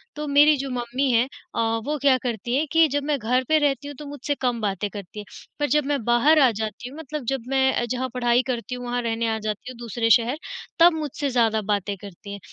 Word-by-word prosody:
तो 300 0 -5
मेरी 290 +2 +6
जो 275 0 -4
मम्मी 250 +2 -1
है 235 +1 +3 0.3
अ, - - -1 0.3
वो 300 +1 -1
क्या 275 -2 +5
करती 240 0 -2
हैं 295 +4 +1
कि 325 0 +5
जब 285 0 -2
मैं 295 0 0
घर 250 +3 +1
पे 315 - +5
रहती 285 -1 0
हूँ 290 - -7
तो 300 - -8
मुझसे 290 0 -4
कम 245 -2 0
बातें 205 0 -2
करती 200 0 -9
है, 210 - -8 0.3
पर 290 - +1
जब 300 +2 +2
मैं 280 -3 -1
बाहर 260 +7 +4
आ 265 -3 +6
जाती 220 +3 -5
हूँ 280 - -12
मतलब 300 -3 -6
जब 270 +1 -1
मैं 265 0 +2
अ, 240 - 0
जहाँ 255 +2 -2
पढ़ाई 240 -1 +2
करती 250 0 -3
हूँ 245 0 -7
वहाँ 245 0 -1
रहने 230 0 -1
आ - - -3
जाती 215 +3 -5
हूँ 250 - -12
दूसरे 235 0 -2
शहर 240 +4 +4 0.4
तब 340 +1 +7
मुझसे 295 -2 -3
ज़्यादा 225 -3 +2
बातें 205 -1 -1
करती 200 +1 -11
हैं। 200 - -7
250 Hz, 245 wpm, -24 LUFS, 230-285 Hz, 0.4 s, तब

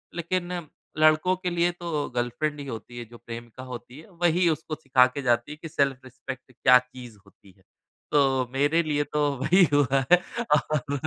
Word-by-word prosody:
लेकिन 175 -1 -3 0.3
लड़कों 155 +4 +4
के 180 0 -3
लिए 175 0 +1
तो 170 -4 -4
गर्लफ्रेंड 145 +5 -2
ही 140 - -6
होती 120 0 -8
है, 120 - -6
जो 120 +1 -14
प्रेमिका 120 +2 -9
होती 125 +2 -9
है, 160 - -15
वही 175 0 +1
उसको 155 0 -3
सिखा 135 -4 +4
के 140 +2 -6
जाती 120 +2 +1
है 150 - -8
कि 165 - -7
सेल्फ 140 -3 0
रिस्पेक्ट 130 0 -9
क्या 125 +1 +5
चीज़ 125 -3 -12
होती 100 -1 -21
है। 95 - -27 0.5
तो 150 - +4 0.3
मेरे 145 +5 +2
लिए 150 -2 0
तो 150 - +1 0.2
वही 180 +6 +5
हुआ 135 -2 +3
है 180 - +9 0.4
और 150 -1 -2
145 Hz, 185 wpm, -26 LUFS, 125-165 Hz, 0.5 s, है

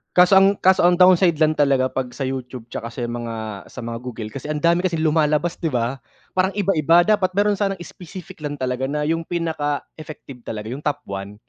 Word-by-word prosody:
Kaso 180 +2 +7
ang 195 +1 +4
kaso 190 -1 +3
ang 175 - +4
downside 180 -1 +5
lang 155 0 +1
talaga 135 -3 +3
'pag 130 -1 -2
sa 135 - -3
YouTube, 125 -2 -5
tsaka 115 - -5
sa 120 +1 -6
mga 115 -3 -5
sa 125 - -9
mga 115 0 -5
Google 115 -3 -7
kasi 140 +4 -7
ang 150 -1 -3
dami 170 +1 +4
kasing 170 -3 -1
lumalabas, 155 +2 +1
'di 165 - -1
ba, 125 -1 -1 0.3
parang 185 +1 0
iba-iba. 175 -4 +4
Dapat 205 -2 +2
meron 205 0 +2
sanang 195 -1 0
specific 180 -1 -11
lang 145 -1 -4
talaga, 130 -1 -2
na 150 +2 -2
'yung 165 +2 -1
pinaka-effective 155 -4 -4
talaga, 110 0 -5
'yung 130 - -5
top 145 -1 -1
1, 100 +1 -7
150 Hz, 200 wpm, -21 LUFS, 125-175 Hz, 0.3 s, Kaso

